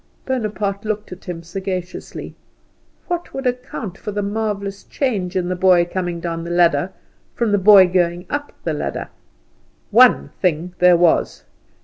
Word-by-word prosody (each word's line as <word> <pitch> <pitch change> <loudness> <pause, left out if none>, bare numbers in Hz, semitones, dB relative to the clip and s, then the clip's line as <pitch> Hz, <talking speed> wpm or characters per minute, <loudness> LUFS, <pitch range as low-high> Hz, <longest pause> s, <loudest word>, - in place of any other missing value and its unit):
Bonaparte 210 -5 -2
looked 215 -1 -3
at 180 - -10
him 170 -2 -6
sagaciously. 185 +1 -5 0.7
What 350 -1 -4
would 270 0 -4
account 245 -6 -4
for 210 - -5
the 205 0 -2
marvellous 200 -1 -3
change 205 -10 -2
in 180 -1 0
the 185 - -1
boy 180 -1 +4
coming 175 -1 -3
down 165 0 -4
the 170 - -6
ladder 175 -1 +2 0.4
from 235 -3 0
the 205 - +3
boy 195 -1 +8
going 175 0 0
up 290 0 -4
the 160 - -1
ladder? 150 - -4 0.8
One 70 - +6
thing 175 0 0
there 180 -1 +6
was. 170 -1 +2
185 Hz, 150 wpm, -20 LUFS, 175-210 Hz, 0.8 s, boy